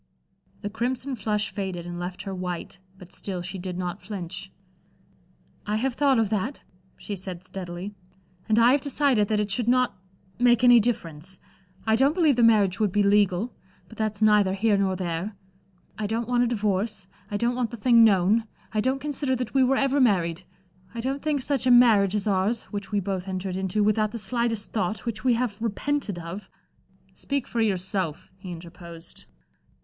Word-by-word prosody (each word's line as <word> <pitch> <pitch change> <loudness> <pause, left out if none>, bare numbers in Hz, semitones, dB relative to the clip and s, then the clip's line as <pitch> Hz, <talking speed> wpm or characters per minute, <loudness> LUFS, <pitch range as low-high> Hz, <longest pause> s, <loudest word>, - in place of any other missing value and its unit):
The 205 - -3
crimson 255 +4 -2
flush 210 -1 -1
faded 190 -4 -4
and 175 0 -6
left 180 +1 -5
her 195 - -5
white, 180 0 -5 0.2
but 180 -2 -12
still 185 -3 -4
she 190 +2 -6
did 180 0 -5
not 180 -1 -4
flinch. 190 -1 -6 1.2
"I 210 - 0
have 250 +4 0
thought 275 0 +3
of 225 -2 +1
that," 220 +6 -2 0.3
she 205 - -5
said, 185 -2 -8
steadily, 185 +1 -7 0.6
"and 215 - +3
I 235 +2 +6
have 280 +1 +3
decided 275 -6 +2
that 215 0 +1
it 210 -1 -1
should 230 +3 0
not 255 0 +2 0.4
make 245 -1 +4
any 245 -1 +8
difference. 185 -6 -3 0.5
I 220 0 +3
don't 275 +6 +3
believe 315 -7 +4
the 240 - +1
marriage 205 -5 +4
would 210 -3 +2
be 205 +2 +2
legal 205 +2 +2 0.3
but 225 - -14
that's 215 -1 -1
neither 210 -3 +4
here 210 +1 +2
nor 195 -1 +1
there. 180 +3 -3 0.6
I 210 - -1
don't 225 +2 -2
want 245 0 +2
a - - 0
divorce, 210 -3 -1 0.2
I 205 - -2
don't 235 +3 +1
want 245 -2 -1
the 235 - -8
thing 235 +1 +5
known, 210 +1 +4 0.3
I 215 - +1
don't 260 +4 +1
consider 285 -2 -1
that 250 -2 -4
we 270 -1 +4
were 260 +1 +3
ever 275 0 +2
married. 180 -7 +2 0.5
I - - -4
don't 270 +3 -2
think 295 -3 -1
such 270 -2 0
a - - +5
marriage 220 -5 +6
as 205 - -1
ours, 205 +3 +1
which 200 -2 -5
we 205 - +1
both 190 -1 -3
entered 185 -1 -3
into 190 +2 0
without 215 +1 +1
the - - -3
slightest 230 -1 -1
thought, 210 +1 -2
which 215 -2 -4
we 250 -2 +3
have 230 -3 -2
repented 230 -1 -2
of" 175 +4 -7 0.6
"Speak 280 -2 -3
for 235 - -2
yourself," 185 -5 -1
he 185 -2 -8
interposed. 170 0 -11
210 Hz, 185 wpm, -25 LUFS, 190-240 Hz, 1.2 s, any